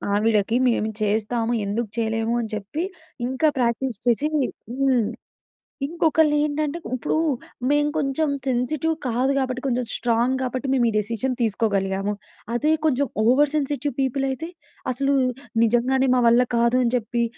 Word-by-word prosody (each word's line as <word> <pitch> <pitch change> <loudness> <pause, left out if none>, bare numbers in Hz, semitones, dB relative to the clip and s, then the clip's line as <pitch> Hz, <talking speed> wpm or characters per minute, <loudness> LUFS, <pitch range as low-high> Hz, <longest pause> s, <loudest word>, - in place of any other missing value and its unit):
ఆవిడకి 215 +1 +2
"మేము 220 -2 0
చేస్తాము 225 +3 0
ఎందుకు 220 +2 -2
చేయలేము" 225 +1 0
అని 225 - -5
చెప్పి 215 - -3 0.4
ఇంకా 265 +4 +1
ప్రాక్టీస్ 235 -1 0
చేసి, 240 +5 +3 0.6
హ్మ్. 255 -5 +3 0.8
ఇంకొకళ్ళు 320 -1 +2
ఏంటంటే 300 +1 -1 0.2
ఇప్పుడు 240 - -2 0.5
మేము 295 +1 +3
కొంచెం 295 +1 0 0.2
సెన్సిటివ్ 270 +6 0
కాదు 250 +2 +1
కాబట్టి, 255 -1 -2
కొంచెం 250 -2 0
స్ట్రాంగ్ 240 +2 +1
కాబట్టి 255 +1 -3
మేము 245 -3 +3
ఈ - - -1
డిసిషన్ 230 +4 -1
తీసుకోగలిగాము. 200 -3 0 0.4
అదే 295 +6 +2
కొంచెం 285 -1 +2 0.2
ఓవర్ 275 +5 +4
సెన్సిటివ్ 290 -1 -1
పీపుల్ 270 +1 0
అయితే! 310 +6 -4 0.4
అసలు 275 +2 +1 0.5
నిజంగానే 250 +4 +2
మా 250 - +3
వల్ల 240 +2 +5
కాదు 235 +2 +3
అని 235 - 0
చెప్పి 235 0 -1
250 Hz, 135 wpm, -23 LUFS, 230-275 Hz, 0.8 s, వల్ల